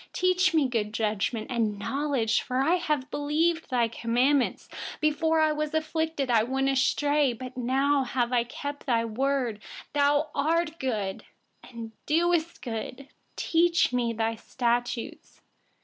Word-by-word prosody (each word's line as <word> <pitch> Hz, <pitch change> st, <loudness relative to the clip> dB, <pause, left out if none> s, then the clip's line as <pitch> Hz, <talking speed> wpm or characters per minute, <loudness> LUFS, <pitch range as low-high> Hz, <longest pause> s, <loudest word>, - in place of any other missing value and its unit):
66Teach 365 Hz, 0 st, +2 dB
me 300 Hz, -4 st, +4 dB
good 215 Hz, -4 st, -2 dB
judgment 220 Hz, +2 st, -1 dB
and 220 Hz, -4 st, 0 dB
knowledge, 265 Hz, -1 st, 0 dB
for 255 Hz, -1 st, -3 dB
I 325 Hz, +7 st, +3 dB, 0.3 s
believe 320 Hz, +3 st, 0 dB
in 250 Hz, -, +1 dB
your 230 Hz, -, +3 dB
commandments. 245 Hz, +4 st, +1 dB, 0.4 s
67Before 320 Hz, +1 st, +2 dB
I 310 Hz, -, +3 dB
was 305 Hz, 0 st, -2 dB
afflicted, 315 Hz, -3 st, -1 dB
I 225 Hz, -2 st, +5 dB
went 265 Hz, +4 st, 0 dB
astray; 285 Hz, +1 st, +2 dB
but 255 Hz, +2 st, -8 dB
now 265 Hz, +2 st, +1 dB
I 250 Hz, -, +3 dB, 0.3 s
observe 285 Hz, +2 st, -5 dB
your 230 Hz, -2 st, +2 dB
word. 250 Hz, -1 st, -1 dB, 0.3 s
68You 290 Hz, +1 st, +3 dB
are 325 Hz, +4 st, +2 dB
good, 210 Hz, -7 st, -2 dB, 0.4 s
and 230 Hz, -2 st, -8 dB, 0.2 s
do 340 Hz, +1 st, +3 dB, 0.2 s
good. 250 Hz, +3 st, -6 dB, 0.3 s
Teach 335 Hz, -4 st, +2 dB
me 235 Hz, -2 st, 0 dB
your 225 Hz, 0 st, 0 dB
statutes. 240 Hz, 0 st, -2 dB
270 Hz, 135 wpm, -27 LUFS, 235-300 Hz, 0.4 s, I